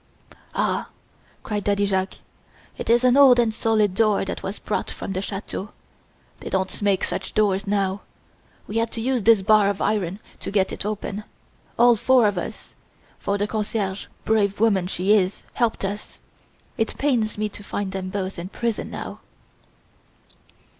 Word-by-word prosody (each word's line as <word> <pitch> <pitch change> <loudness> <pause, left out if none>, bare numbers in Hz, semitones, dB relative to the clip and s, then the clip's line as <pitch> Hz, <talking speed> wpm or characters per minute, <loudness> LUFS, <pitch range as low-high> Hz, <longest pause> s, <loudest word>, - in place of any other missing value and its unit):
"Ah!" - - 0 0.5
cried 210 -2 -2
Daddy 205 0 +2
Jacques, 190 -1 0 0.6
"it - - -6
is 240 +2 +5
an 250 0 +5
old 275 -3 +8
and 230 -2 +2
solid 215 -3 +2
door 210 -1 +2
that - - -4
was 195 +2 -4
brought 210 - -2
from 195 - -5
the 190 - -2
chateau 200 0 -5 0.7
they - - -6
don't 190 +1 -2
make 200 -2 +2
such 190 - -3
doors 200 -1 +2
now. 195 -1 0 0.6
We 215 - -4
had 230 0 0
to - - -4
use 250 +1 0
this 215 -2 +5
bar 210 0 +5
of 200 - -2
iron 200 -3 0 0.2
to - - -5
get 195 -1 +1
it - - -4
open, 210 0 -4 0.5
all 240 0 +6
four 250 +2 +4
of 200 -3 0
us - - -7 0.5
for 200 - -1
the 205 - 0
concierge, 210 -2 -2 0.2
brave 205 -3 +2
woman 200 -5 +3
she 190 +2 +2
is, 195 -2 +1
helped 230 -4 0
us. 205 +2 -5 0.6
It 225 - 0
pains 240 -8 +1
me 215 0 0
to 205 - -10
find 200 -1 -3
them 190 -1 -4
both 190 -1 -3
in 175 +2 -6
prison 230 +1 -2
now." - - -6
205 Hz, 165 wpm, -23 LUFS, 195-220 Hz, 0.7 s, old